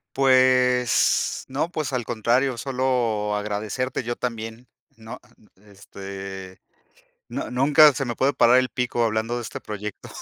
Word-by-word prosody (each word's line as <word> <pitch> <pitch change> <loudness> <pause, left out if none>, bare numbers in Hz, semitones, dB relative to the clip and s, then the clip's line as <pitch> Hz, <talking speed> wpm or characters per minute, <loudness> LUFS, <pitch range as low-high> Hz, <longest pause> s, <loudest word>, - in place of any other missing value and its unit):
Pues 130 -2 +3
no, 140 +5 -1
pues 155 -5 -4
al 125 -3 -2
contrario, 120 +3 0
solo 120 -5 -1
agradecerte 105 +5 -3
yo 120 0 -4
también, 115 0 -6 0.3
¿no? 110 0 -10 0.4
Este, 95 -1 -10 0.7
nu - - -5
nunca 145 +4 +5
se 135 +2 -3
me 120 -2 -4
puede 140 +2 +1
parar 125 +2 +5
el 130 - -1
pico 125 -1 -1
hablando 110 +2 -1
de - - -4
este 115 - -7
proyecto. 105 0 -7
120 Hz, 135 wpm, -23 LUFS, 105-130 Hz, 0.7 s, nunca